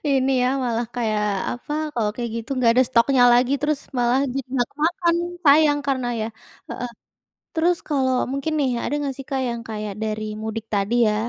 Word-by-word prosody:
Ini 270 -1 +2
ya 250 - +3 0.2
malah 235 -1 -1
kayak 215 -3 0 0.3
apa 245 +4 -7 0.2
kalau 215 -3 +1
kayak 240 -2 -3
gitu 230 +2 -6
nggak 235 -2 +4
ada 255 - +6
stoknya 250 +1 +4
lagi 250 +2 +4
terus 295 -1 0 0.2
malah 245 +2 +3
dimakan-makan 295 +7 0 0.3
sayang 290 0 +6
karena 260 -3 0
ya 215 - -1 0.4
heeh. 245 0 -4 0.6
Terus 345 +2 +2
kalau 265 -4 +1 0.2
mungkin 275 +3 -2
nih 270 -3 +2
ada - - -2
nggak 275 -2 -3
sih 270 - -6
Kak 265 -1 -1
yang 235 -1 -3
kayak 210 -2 -4
dari 215 0 -3
mudik 220 0 -4
tadi 205 +4 +1
ya, 210 - +1
250 Hz, 175 wpm, -22 LUFS, 230-280 Hz, 0.6 s, ada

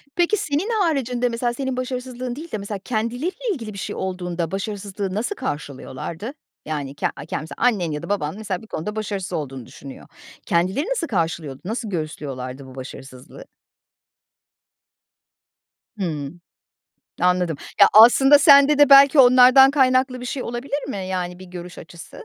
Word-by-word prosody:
Peki, 350 +4 +2
senin 310 +7 -2
haricinde 250 -7 0
mesela 240 +1 -2
senin 265 0 -4
başarısızlığın 255 -1 -4
değil 325 +3 -9
de 215 - -2
mesela 200 0 -6
kendileriyle 240 - -3 0.2
ilgili 225 - -7
bir - - -10
şey - - -5
olduğunda 180 -3 -4
başarısızlığı 200 -1 -4
nasıl 230 - -2
karşılıyorlardı? 155 - -6 0.3
Yani, 145 -3 -4
ke - - 0
a 145 - -9
ken 155 - -4
mesela 160 - -9
annen 205 -9 +1
ya 150 0 -5
da - - -8
baban 160 -5 -2
mesela 200 -4 -4
bir 220 - -14
konuda 210 +3 -5
başarısız 200 -4 -4
olduğunu 135 -6 -5
düşünüyor. 135 +2 -12 0.4
Kendileri 185 - 0
nasıl 465 -10 -1
karşılıyordu, 165 - -3
nasıl 220 +2 -4
göğüslüyorlardı 140 -6 -5
bu 130 -1 -13
başarısızlığı? 130 0 -11 2.5
Hımm. 160 -2 -4 0.8
Anladım. 180 -3 +1 0.2
Ya, - - +9
aslında 270 +6 +7
sende 280 0 +6
de 290 -1 +6
belki 275 +1 +8
onlardan 255 +1 +7
kaynaklı 255 -2 +2
bir 250 - -6
şey 255 +1 -4
olabilir 265 +4 -4
mi, 265 - -4
yani, 180 -1 -4
bir 185 - -11
görüş 180 0 -9
açısı? 165 0 -12
205 Hz, 150 wpm, -22 LUFS, 165-255 Hz, 2.5 s, Ya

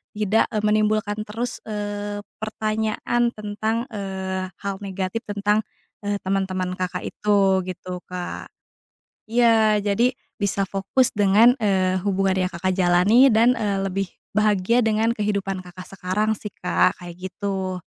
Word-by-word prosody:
tidak, 210 +1 +2
eee, 215 -2 -1
menimbulkan 215 0 +1
terus, 230 +4 -4
eee, 205 -1 -4 0.2
pertanyaan 220 +2 -1
tentang, 215 +2 -2
eee, 190 -2 -4
hal 200 -1 -2
negatif 195 +1 -3
tentang, 205 +1 +1 0.4
eee, 205 0 -1
teman-teman 185 -1 -1
Kakak 185 -1 -3
itu 200 -2 +2
gitu, 180 0 -6
Kak. 180 -1 -6 0.8
Iya, 225 -2 +4
jadi 210 +5 +2 0.2
bisa 200 -1 0
fokus 195 +6 +1
dengan, 210 +5 +5
eee, 190 -4 +1
hubungan 195 -1 +1
yang 180 - -3
Kakak 185 +2 -1
jalani 190 +9 +5
dan, 235 +3 +5
eee, 205 -3 0
lebih 195 0 -1 0.3
bahagia 215 +2 +3
dengan 225 0 +2
kehidupan 200 -3 -2
Kakak 185 0 -11
sekarang 195 +3 0
sih, 210 0 -7
Kak, 180 +1 +2
kayak 175 -1 -9
gitu. 190 -1 -3
205 Hz, 130 wpm, -23 LUFS, 190-215 Hz, 0.8 s, dengan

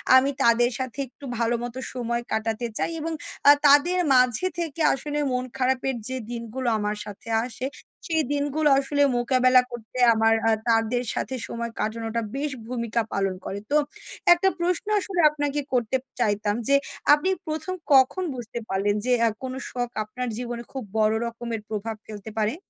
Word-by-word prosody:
আমি 260 +2 +5
তাদের 240 +1 +4
সাথে 260 +1 -5
একটু 275 +3 -14
ভালোমতো 240 +1 -1
সময় 235 -1 -2
কাটাতে 225 +2 -1
চাই - - -1
এবং 325 +2 -3 0.4
আ - - +12 0.2
তাদের 315 +6 +5 0.2
মাঝে 250 +7 +4
থেকে 330 -1 -3
আসলে 290 +3 -4
মন 250 0 0
খারাপের 260 0 0
যে 260 0 -2
দিনগুলো 235 +2 -4
আমার 210 0 -1
সাথে 205 +2 -10 0.2
আসে, 255 +1 -5 0.4
সেই 320 -2 +1
দিনগুলো 290 +1 +1
আসলে 285 +1 -1 0.2
মোকাবেলা 255 0 +4
করতে 240 +1 -9 0.2
আমার 225 0 +3 0.2
আ - - +4 0.2
তাদের 230 +2 +2
সাথে 260 - -3
সময় 235 0 -4
কাটানোটা 225 +1 -2
বেশ 290 +1 -2 0.2
ভূমিকা 235 -1 -1
পালন 195 -1 0
করে। 200 - -4
তো 300 - +5 0.6
একটা 365 +2 +2
প্রশ্ন 350 0 0
আসলে 375 -2 -4
আপনাকে 290 -1 -2
করতে 245 +1 +1 0.2
চাইতাম 210 -2 +1
যে 280 - +5 0.4
আপনি 300 +5 +2 0.2
১ম 315 +4 -3 0.2
কখন 265 +8 +5
বুঝতে 235 -1 -6
পারলেন 200 +2 +1
যে 255 - +1 0.2
আ - - +3
কোন 255 - -4 0.2
শখ 245 -1 -3
আপনার 250 +4 -5
জীবনে 240 -1 -5
খুব 265 -2 -5 0.2
বড় 215 0 +3
রকমের 235 -1 -5
প্রভাব 220 +1 -3
ফেলতে 215 0 -8
পারে? 215 +5 +1
245 Hz, 160 wpm, -25 LUFS, 225-275 Hz, 0.6 s, আ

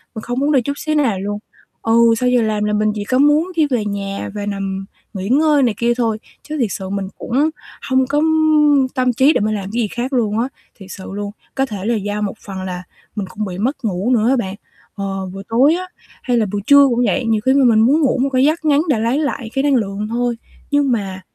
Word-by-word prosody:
mình 220 - -5
không 245 +3 -3
muốn 290 +2 +1
đi 270 - +4
chút 280 +4 -3
xíu 310 +1 -2
nào 240 -10 +1
luôn. 205 +2 -3 0.4
Ừ, 230 0 +4
sau 250 0 +2
giờ 250 -1 +3
làm 215 -1 0
là 210 0 0
mình 215 0 +2
chỉ 205 - -3
có 255 +5 0
muốn 295 +6 +3
đi 315 -3 +3
về 245 -6 -1
nhà 200 -1 -4
và 205 -1 -4
nằm 195 -1 -3 0.3
nghỉ 195 +1 -4
ngơi 295 +1 +4
này 235 -4 +2
kia 240 0 +2
thôi 225 -3 0 0.2
chứ 305 0 -5
thiệt 235 - +2
sự 190 -1 -5
mình 195 -1 -3
cũng 275 +6 0 0.4
hông 260 -1 +2
có 290 +2 +1 0.7
tâm 255 -1 +1
trí 265 +6 +4
để - - +1
mình 215 +1 0
làm 200 - -4
cái 240 - 0
gì 215 - 0
khác 245 +6 -4
luôn 220 -4 +1
á, 240 - 0 0.3
thiệt 195 - -12
sự 190 - -8
luôn. 205 0 -4 0.2
Có 270 - +1
thể 205 -6 -6
là 235 +1 +1
do 205 0 -3
một 205 - -2
phần 195 -2 -6
là 180 -1 -5 0.3
mình 200 -3 -3
cũng 215 -1 -4
bị 180 -1 -6
mất 260 +4 -2
ngủ 200 +3 -1
nữa 235 -1 +3
á 270 - +4
bạn, 190 -4 -3 0.4
ờ, 195 -1 -4
buổi 195 0 -7
tối 265 +8 +4
á 365 +1 -4 0.4
hay 245 -2 +1
là 220 - +2
buổi 205 - -2
trưa 280 -1 +7
cũng 240 0 +1
vậy, 260 0 0
nhiều 220 -2 +1
khi 260 - +4
mà 275 -1 +4
mình 225 -2 +5
muốn 275 +8 +4
ngủ 270 - +2
một 275 - +1
cái 260 0 +2
giấc 315 +1 0
ngắn 295 0 +4
để 255 -6 +2
lấy 235 +6 +1
lại 275 -6 -3
cái 270 - 0
năng 285 -1 +3
lượng 210 -2 -2
thôi, 240 0 -1 0.3
nhưng 285 -2 +2
mà 195 -5 -2
230 Hz, 255 wpm, -18 LUFS, 205-270 Hz, 0.7 s, trưa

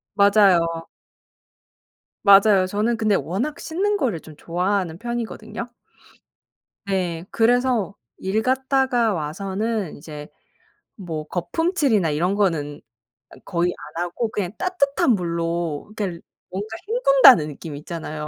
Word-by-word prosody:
맞아요. 190 -5 +4 1.4
맞아요. 195 -1 +6
저는 215 +4 0
근데 215 -2 +1
워낙 240 - -2
씻는 405 +5 -1
거를 225 - -1
좀 155 -2 -13
좋아하는 180 -1 -1
편이거든요? 235 0 -5 1.1
네. 180 -3 -2
그래서 240 -3 +2 0.2
일 200 +4 -1
갔다가 260 -3 +1
와서는 195 +5 -3
이제 150 -1 -9 0.7
뭐 165 -6 -6
거품칠이나 220 - 0
이런 175 +6 0
거는 160 -8 -1 0.7
거의 175 -1 0 0.2
안 175 - 0
하고 195 +6 -3
그냥 195 -4 -3
따뜻한 285 -9 +1
물로 170 -2 -2
겔 185 -6 -4 0.3
뭔가 195 +3 -4 0.2
헹군다는 275 - +6
느낌 150 0 -8
있잖아요. 155 -1 -6
195 Hz, 245 characters per minute, -22 LUFS, 170-235 Hz, 1.4 s, 맞아요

